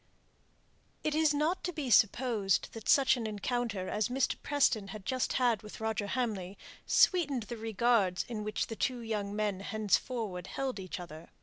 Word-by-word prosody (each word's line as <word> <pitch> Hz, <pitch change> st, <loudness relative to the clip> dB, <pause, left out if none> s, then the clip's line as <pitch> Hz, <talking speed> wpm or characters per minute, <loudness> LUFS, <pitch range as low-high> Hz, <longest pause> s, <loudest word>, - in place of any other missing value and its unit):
It 310 Hz, -, 0 dB
is 310 Hz, 0 st, +3 dB
not 305 Hz, +5 st, 0 dB
to 355 Hz, -, -1 dB
be 295 Hz, -6 st, -4 dB
supposed 220 Hz, -2 st, +3 dB
that 225 Hz, -2 st, -7 dB
such 275 Hz, -3 st, +5 dB
an 230 Hz, -2 st, -3 dB
encounter 215 Hz, -2 st, -2 dB
as 210 Hz, +2 st, 0 dB
Mr. 260 Hz, +1 st, +1 dB
Preston 255 Hz, -8 st, +2 dB
had 205 Hz, -1 st, -9 dB
just 255 Hz, +4 st, 0 dB
had 240 Hz, -5 st, +2 dB
with 210 Hz, -, -10 dB
Roger 220 Hz, -2 st, -2 dB
Hamley 205 Hz, -6 st, -2 dB, 0.3 s
sweetened 290 Hz, -, +3 dB
the 230 Hz, +3 st, -7 dB
regards 220 Hz, -4 st, +1 dB
in 225 Hz, -3 st, -4 dB
which 215 Hz, +1 st, -1 dB
the 225 Hz, -, -6 dB
two 250 Hz, +2 st, -1 dB
young 210 Hz, -3 st, -3 dB
men 210 Hz, -3 st, -1 dB
henceforward 210 Hz, -1 st, -1 dB
held 265 Hz, -5 st, -3 dB
each 185 Hz, -1 st, -6 dB
other. 170 Hz, -2 st, -10 dB
220 Hz, 170 wpm, -31 LUFS, 200-255 Hz, 0.3 s, such